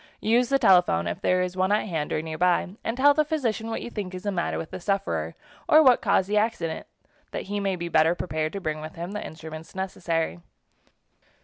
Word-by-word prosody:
Use 235 +3 +3
the 275 - +4
telephone, 180 - +4
if 85 - -4
there 180 0 +2
is 180 0 -4
one 185 +1 +1
at 210 +1 +1
hand 160 -5 -3
or 155 - -1
nearby, 170 +3 +1
and 225 +2 -2
tell 285 +2 +6
the 305 +1 +3
physician 240 -8 -2
what 225 - -3
you 240 - -7
think 190 -5 -5
is 185 - -7
the 205 - -1
matter 175 -3 -1
with 160 - -6
the - - -6
sufferer 195 +2 -2 0.3
or 310 +1 +8
what 255 -3 +5
caused 195 -3 +2
the 210 +1 +1
accident, 210 -7 -1 0.4
that - - -4
he 205 +1 -3
may 195 -1 0
be 170 -1 -4
better 160 0 +3
prepared 155 -3 -2
to 200 - -3
bring 155 -4 -3
with 155 0 -8
him 170 +3 -5
the 210 - -4
instruments 160 +1 -9
necessary. 175 -3 -2
185 Hz, 220 wpm, -26 LUFS, 165-215 Hz, 0.4 s, or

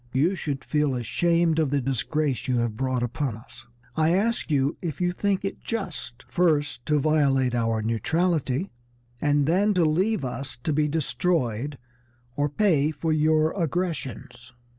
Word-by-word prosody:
You 150 +8 +3
should 145 -7 -4
feel 150 -3 +1
ashamed 165 +7 +1
of 155 -3 +2
the 140 +1 +1
disgrace 135 +2 -1
you 125 -1 +1
have 115 -2 -1
brought 130 0 -1
upon 120 -1 -2
us. 115 +1 -16 0.3
I 160 +1 +3
ask 230 +3 0
you 140 0 +1
if 165 -5 -4
you 180 -1 +1
think 195 +1 -1
it 195 - -4
just, 175 - -5
first 145 -7 +1
to 150 -1 +3
violate 140 -4 +2
our 115 -2 0
neutrality 155 - 0 0.5
and 145 -1 +2
then 195 +6 +2
to 175 -2 +4
leave 185 +3 +1
us 130 0 -5
to 155 - 0
be 150 +1 +2
destroyed 145 - -1 0.6
or 145 +1 +1
pay 155 -4 +2
for 155 +1 -1
your 155 0 +3
aggressions?" 135 - -4
150 Hz, 155 wpm, -25 LUFS, 130-170 Hz, 0.6 s, to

